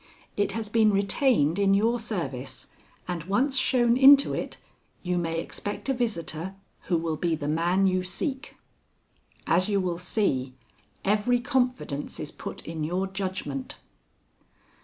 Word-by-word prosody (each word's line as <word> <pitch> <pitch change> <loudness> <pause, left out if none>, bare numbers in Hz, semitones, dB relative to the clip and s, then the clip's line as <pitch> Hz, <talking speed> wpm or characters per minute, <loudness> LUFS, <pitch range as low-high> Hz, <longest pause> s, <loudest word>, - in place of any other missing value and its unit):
It 205 - 0
has 225 -1 -3
been 215 0 +3
retained 200 - +2
in 195 -1 +4
your 230 +4 +2
service, 135 - -5 0.4
and 175 -3 -3
once 255 +9 +1
shown 245 -3 +3
into 275 +1 +7
it, - - -4 0.5
you, 180 -1 0
may 165 -1 -2
expect 205 +8 -5
a - - +3
visitor 190 -7 -3 0.3
who 175 - +1
will 160 -1 -2
be 170 0 0
the 145 -2 -5
man 170 +5 +2
you 185 -1 +2
seek. 260 - -4 0.9
"As 185 +4 +2
you 200 -1 +2
will 175 -2 -2
see, 135 - -1 0.5
every 215 +5 +2
confidence 250 - -1
is 150 - -5
put - - -8
in 160 -1 -4
your 180 +5 -1
judgment." 185 -8 -4
190 Hz, 140 wpm, -26 LUFS, 165-225 Hz, 0.9 s, into